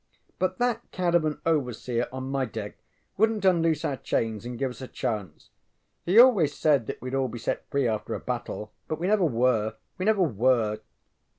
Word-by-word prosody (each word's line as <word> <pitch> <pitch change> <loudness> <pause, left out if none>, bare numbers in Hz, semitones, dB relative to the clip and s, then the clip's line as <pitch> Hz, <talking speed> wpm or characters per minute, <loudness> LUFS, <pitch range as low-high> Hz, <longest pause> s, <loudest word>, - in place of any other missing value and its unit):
But 185 0 0
that 245 -2 +1
cad 180 -2 -1
of 170 -2 +4
an 150 -1 -2
overseer 125 -6 0
on 130 0 -5
my 135 0 -1
deck 110 -4 -5 0.4
wouldnŌĆÖt 220 -2 +2
unloose 165 -3 +1
our 135 - -1
chains 115 -1 -2
and 120 -1 -6
give 135 0 -1
us 125 - -11
a 130 - -6
chance. 105 - -4 0.6
He 185 +5 +3
always 215 - +6
said 140 -7 +2
that - - -5
weŌĆÖd 130 +2 -2
all 130 - 0
be 120 0 -7
set 115 - -3
free 140 -3 +1
after 110 -2 -2
a - - -4
battle, 120 -3 -5 0.2
but 155 - -2
we 170 - -3
never 200 -1 +3
were; 115 -5 +1 0.2
We 185 - -1
never 215 -3 +3
were. 115 - +2
130 Hz, 195 wpm, -27 LUFS, 115-170 Hz, 0.6 s, always